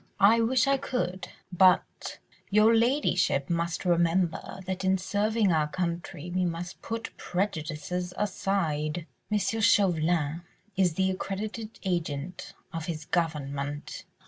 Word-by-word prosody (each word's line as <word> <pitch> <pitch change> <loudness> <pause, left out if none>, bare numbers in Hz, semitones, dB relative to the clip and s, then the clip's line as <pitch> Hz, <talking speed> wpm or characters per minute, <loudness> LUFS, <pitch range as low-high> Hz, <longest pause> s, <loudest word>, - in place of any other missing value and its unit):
"I 215 +4 +6
wish 250 +3 +3
I 275 0 +3
could... 190 -9 -3 0.3
but 185 0 +3 0.3
your 215 +2 +5
ladyship 205 - +2
must 170 +2 -1
remember 175 +1 +1
that 190 0 -3
in 190 0 +3
serving 205 +2 +1
our 155 -2 +2
country 170 0 -4
we 185 0 +1
must 175 0 -4
put 230 0 -5
prejudices 180 -1 -2
aside. 170 -6 -1 0.3
M. 210 - +3
Chauvelin 175 -7 +2 0.3
is 185 -4 +2
the 190 +1 +2
accredited 210 +4 -5
agent 170 -3 -3 0.2
of 165 -1 -4
his 155 -3 -4
Government 145 -4 -2
180 Hz, 120 wpm, -28 LUFS, 165-200 Hz, 0.3 s, I